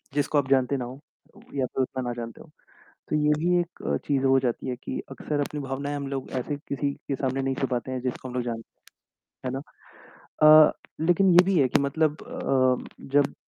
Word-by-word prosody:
जिसको 145 +1 +1
आप 135 -2 +1
जानते 135 0 +3
ना 125 - -3
हों 130 +3 -9 0.6
या 130 - +2
तो - - +2
उतना 130 0 -4
ना - - -2
जानते 115 -1 -7
हो। - - -15 0.6
तो - - +1
ये 150 0 +3
भी 175 +2 +3
एक 175 0 -9
अ, 70 - +1
चीज़ 135 -2 +1
हो 135 0 +5
जाती 125 0 -2
है 125 - -2
कि - - -4
अक्सर 145 +2 -3
अपनी 145 +1 -3
भावनाएँ 140 +2 -3
हम 140 -1 -4
लोग 135 -1 -4
ऐसे 145 +3 -3
किसी 140 0 -1 0.2
के 140 - +1
सामने 135 0 -1
नहीं 135 0 0
छुपाते 130 -1 -2
हैं, 130 -1 -3
जिसको 130 0 -4
हम - - -8
लोग 125 - 0
जान 115 -2 -4 0.8
है 130 - -1
ना? 135 +1 -3 0.8
अ, 155 0 +9 0.3
लेकिन 175 +4 +4
ये 180 +1 +7
भी 190 -3 +2
है 135 - +4
कि - - +3
मतलब 150 +2 +1
अ, 130 -2 +1 0.3
जब 145 -1 +3
135 Hz, 215 wpm, -26 LUFS, 130-150 Hz, 0.8 s, अ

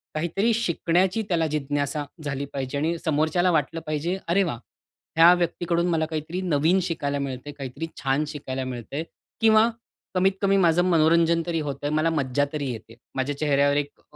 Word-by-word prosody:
काहीतरी 195 +8 +1
शिकण्याची 185 -1 +1
त्याला 165 -2 +2
जिज्ञासा 145 0 -2 0.2
झाली 140 -1 -3
पाहिजे 135 +1 -3
आणि 165 +3 0
समोरच्याला 160 +4 +2
वाटलं 160 +1 0
पाहिजे, 160 +5 -1
"अरे 195 +3 +3
वाह! 120 -10 -3 0.6
ह्या 170 +2 +8
व्यक्तीकडून 175 0 0
मला 160 -2 +1
काहीतरी 160 +3 -4
नवीन 170 +1 +2
शिकायला 145 -5 -2
मिळतंय, 140 +1 -5
काहीतरी 140 +3 -6 0.2
छान 135 +3 +1
शिकायला 135 -3 -5
मिळतंय." 130 +5 -5 0.4
किंवा 220 0 +5 0.5
कमीत 190 +1 +4
कमी 195 0 +3
"माझं 175 -1 +4
मनोरंजन 165 0 +4
तरी 165 -2 -1
होतंय. 140 +1 -3
मला 155 +2 +2
मज्जा 145 -2 0
तरी 145 -4 -2
येते. 115 0 -9 0.2
माझ्या 135 +2 -2
चेहऱ्यावर 145 -1 +2
एक 145 0 -4
155 Hz, 155 wpm, -25 LUFS, 140-170 Hz, 0.6 s, ह्या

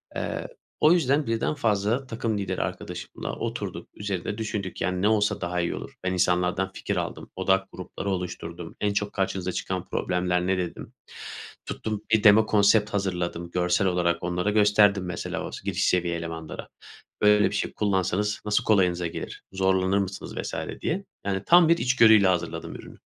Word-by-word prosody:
Eee, - - -3 0.3
o 155 - +6
yüzden 145 -4 +2
birden 115 +5 0
fazla 115 -1 0
takım 115 -2 -2
lideri 95 -2 -2
arkadaşımla - - -5
oturduk. - - -5
Üzerinde 100 0 -4
düşündük, 105 -4 -4
yani, 90 +1 0
ne 100 - +3
olsa 105 -1 +2
daha 90 0 -2
iyi 85 - -1
olur. - - -8
Ben 90 0 0
insanlardan 90 +1 +1
fikir - - -3
aldım. - - -4
Odak 95 +1 +1
grupları 95 +2 -6
oluşturdum. 90 -2 -5
En 105 -1 +1
çok 105 0 -2
karşınıza 95 -1 -1
çıkan 90 0 -3
problemler 90 0 0
ne 95 0 +2
dedim. 90 -2 -5 0.7
Tuttum 110 -2 -4
1 110 -2 +4
demo 110 +1 +7
konsept 105 0 +4
hazırladım. 90 -3 -2
Görsel 90 +2 +1
olarak 85 -2 +1
onlara 90 +3 0
gösterdim 105 -2 +4
mesela 90 -1 -4
o - - -8
s - - -7
giriş - - 0
seviye 85 -1 +1
elemanlara. 80 -1 -6 0.5
Böyle 105 0 +5
bir - - -5
şey 100 - -2
kullansanız 100 +1 0
nasıl 105 0 +1
kolayınıza 90 -5 +2
gelir? 85 - -7
Zorlanır 95 0 +2
mısınız 100 -1 -3
vs. - - -4 0.3
diye. - - -2 0.2
Yani, 95 -1 -1
tam 170 -1 +6
bir 170 - +5
içgörüyle 110 - +5
hazırladım 85 -2 -1
ürünü. - - -11
95 Hz, 165 wpm, -26 LUFS, 90-105 Hz, 0.7 s, demo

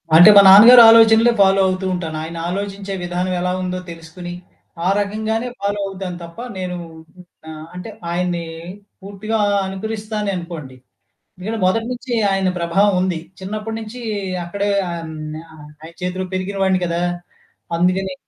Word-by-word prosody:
అంటే 175 +6 +9
మా 200 - +10
నాన్నగారు 230 +6 +10
ఆలోచనలే 225 +1 +6
ఫాలో 195 0 +4
అవుతూ 185 +1 -2
ఉంటాను. 165 -3 -4
ఆయన 165 +1 -7
ఆలోచించే 200 +1 -5
విధానం 180 +1 -2
ఎలా 180 0 -1
ఉందో 185 0 -3
తెలుసుకొని, 170 +2 -9 0.5
ఆ - - +2
రకంగానే 220 +3 -2
ఫాలో 205 0 -2
అవుతాను 190 -2 -6
తప్ప 170 +6 -12 0.2
నేను 180 -1 -4 0.7
ఆహ్, 155 0 -9
అంటే 180 +5 -7 0.2
ఆయన్ని 175 -1 -2 0.6
పూర్తిగా 205 +3 -4 0.3
అనుకరిస్తానే 210 +1 -4
అనుకోండి. 165 -7 -8 0.7
ఇక్కడ 220 +4 -4
మొదటి 225 +5 +1
నుంచి 245 0 -7 0.2
ఆయన 195 -1 0
ప్రభావం 195 +4 +2
ఉంది. 180 -3 -1 0.2
చిన్నప్పటి 215 +3 -5
నుంచి 225 +3 -9 0.4
అక్కడే 200 +4 -3 0.2
హ్మ్. 165 -2 -6 0.4
ఆహ్, 150 -1 -13 0.2
ఆయన 165 +1 -11
చేతిలో 185 +1 -3
పెరిగినవాడిని 190 0 0
కదా! 170 0 -2 0.8
అందుకనే. 185 +2 0
190 Hz, 135 wpm, -19 LUFS, 175-210 Hz, 0.8 s, మా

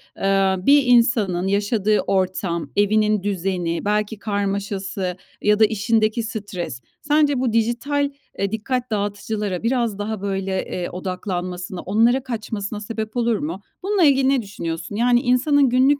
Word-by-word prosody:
aaa, 195 -1 +1
bir 285 0 +6
insanın 230 -7 +3
yaşadığı 205 +1 +1
ortam, 185 -3 -1
evinin 210 0 +2
düzeni, 180 -3 -2
belki 210 +1 0
karmaşası 200 -2 -2 0.2
ya 210 0 +3
da 220 - +8
işindeki 220 +1 +1
stres, 195 - -5 0.2
sence 295 -2 +2
bu 250 -3 0
dijital, 245 +6 +1 0.3
eee, 200 0 0
dikkat 245 +3 -2
dağıtıcılara 205 -2 -2
biraz 235 -3 0
daha 210 -1 -3
böyle, 195 -1 -2
eee, 180 -1 -4
odaklanmasına, 180 0 -4
onlara 230 +6 +2
kaçmasına 215 -4 -4
sebep 220 +2 -5
olur 235 -2 +2
mu? 170 +6 -4 0.2
Bununla 395 -1 +2
ilgili 270 -3 +4
ne 270 -2 +2
düşünüyorsun? 170 -3 -5
Yani 240 +2 +3
insanın 270 +3 +3
günlük 265 +3 +4
210 Hz, 135 wpm, -22 LUFS, 195-240 Hz, 0.3 s, da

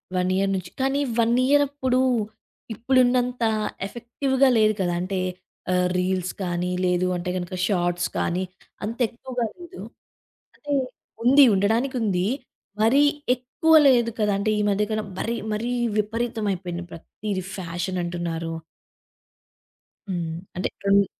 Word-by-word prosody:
1 180 0 +1
year 195 +1 +1
నుంచి. 185 -2 -5
కానీ 270 +1 +1 0.5
year 290 0 +5
అప్పుడు 260 -3 0 0.7
ఇప్పుడున్నంత 250 +1 +2 0.4
ఎఫెక్టివ్‌గా 265 +4 0
లేదు 215 -1 +4
కదా! 175 -1 0
అంటే 185 +1 -2 0.5
ఆహ్, 180 0 +3
రీల్స్ 185 0 -1
కానీ, 180 0 -1
లేదు 180 0 +2
అంటే 175 +1 -4
గనుక 175 0 -4
షార్ట్స్ 175 -3 0
కానీ 180 +2 0 0.4
అంత 225 +3 -3
ఎక్కువగా 245 +1 -4
లేదు. 350 +1 -11 0.8
అంటే, 290 -1 -6 0.5
ఉంది 275 +4 +7
ఉండడానికుంది. 215 -2 +1 0.6
మరీ 265 +6 +5 0.3
ఎక్కువ 255 +6 0 0.2
లేదు 240 -3 +4
కదా! 210 -1 +2
అంటే 200 +2 0
ఈ - - +1
మధ్యకన్నా 210 +2 0
మరి, 235 +3 -1 0.2
మరీ 230 +3 -2 0.3
విపరీతమైపోయింది. 210 -5 -2
ప్రతీది 190 +3 -5
ఫ్యాషన్ 180 0 -3
అంటున్నారు. 170 -1 -3 1.6
హ్మ్. 170 -3 -2 0.2
అంటే 180 - -1 0.2
హ్మ్. 200 0 +5
205 Hz, 115 wpm, -24 LUFS, 180-245 Hz, 1.6 s, ఉంది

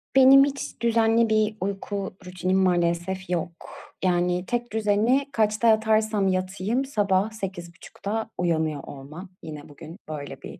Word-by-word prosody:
Benim 270 +1 +8
hiç 280 -3 -6
düzenli 230 0 +3
bir 215 0 +2
uyku 195 0 -4
rutinim 185 +1 -1
maalesef 180 0 0
yok. 175 -1 -1 0.5
Yani, 180 0 +1
tek 240 +1 -3
düzeni 220 +5 +2
kaçta 215 0 +1
yatarsam 220 -2 +3
yatayım 190 +7 -1
sabah 205 -5 +1
8.30'da 195 +2 -6
uyanıyor 160 -4 -1
olmam. 150 +7 -10
Yine 150 -2 -9
bugün 155 +4 -11
böyle 145 -3 -7
bir - - -10
195 Hz, 125 wpm, -25 LUFS, 175-220 Hz, 0.5 s, Benim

